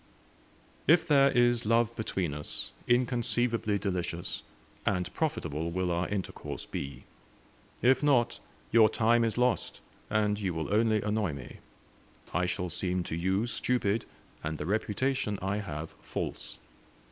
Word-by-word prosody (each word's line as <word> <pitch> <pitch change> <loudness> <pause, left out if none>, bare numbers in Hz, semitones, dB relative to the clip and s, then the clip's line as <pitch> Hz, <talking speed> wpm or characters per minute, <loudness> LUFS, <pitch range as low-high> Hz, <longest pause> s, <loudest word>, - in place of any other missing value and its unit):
"If 165 +1 +6
there 140 -3 +6
is 120 -1 +3
love 115 +1 +2
between 95 -8 -2
us, 75 0 -4 0.2
inconceivably 120 -3 +2
delicious, 90 -4 -2 0.4
and 90 -3 0
profitable 80 - -1
will 90 +1 -1
our 85 +1 0
intercourse 100 -2 -4
be; 70 0 -6 0.8
if 130 +1 +5
not, 135 -5 +3 0.3
your 110 -2 +7
time 115 +2 +3
is 115 -1 0
lost, 125 0 +1 0.3
and 105 -1 +1
you 95 -5 -1
will 80 +4 -2
only 110 -1 +3
annoy 105 -5 0
me. 65 -3 -9 0.8
I 90 0 +1
shall 90 0 -2
seem 90 +2 -1
to 80 - -4
you 95 +5 +1
stupid, 120 -3 0 0.4
and 80 0 -2
the 75 - -4
reputation 105 - 0
I 95 +2 -1
have 80 -6 -5
false. - - -4
105 Hz, 135 wpm, -30 LUFS, 90-120 Hz, 0.8 s, your